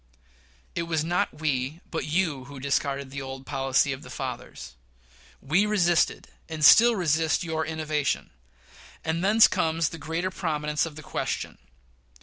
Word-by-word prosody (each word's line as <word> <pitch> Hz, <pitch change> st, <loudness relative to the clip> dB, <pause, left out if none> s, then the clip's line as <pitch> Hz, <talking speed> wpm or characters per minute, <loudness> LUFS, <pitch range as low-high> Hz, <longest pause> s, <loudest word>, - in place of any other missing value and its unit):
It 170 Hz, -1 st, -3 dB
was 160 Hz, -2 st, +1 dB
not 175 Hz, -1 st, -1 dB
we, 140 Hz, 0 st, -1 dB
but 165 Hz, -, -2 dB
you, 155 Hz, -5 st, 0 dB
who 140 Hz, 0 st, -10 dB
discarded 140 Hz, 0 st, -1 dB
the 140 Hz, 0 st, -5 dB
old 135 Hz, 0 st, -7 dB
policy 135 Hz, 0 st, +1 dB
of 135 Hz, -, -8 dB
the -, -, -12 dB
fathers. 120 Hz, -, -6 dB, 0.7 s
We 175 Hz, +10 st, +2 dB
resisted 175 Hz, -5 st, +2 dB, 0.2 s
and 155 Hz, -2 st, 0 dB
still 235 Hz, +7 st, +8 dB
resist 160 Hz, -2 st, +1 dB
your 160 Hz, -1 st, -2 dB
innovation; 155 Hz, -2 st, -2 dB, 0.7 s
and 160 Hz, +2 st, -1 dB
thence 215 Hz, +3 st, +6 dB
comes 165 Hz, -4 st, 0 dB
the 165 Hz, -, -9 dB
greater 165 Hz, +5 st, -2 dB
prominence 150 Hz, -4 st, -1 dB
of 155 Hz, -, -10 dB
the 155 Hz, -, -10 dB
question. -, -, -4 dB
155 Hz, 145 wpm, -26 LUFS, 140-170 Hz, 0.7 s, still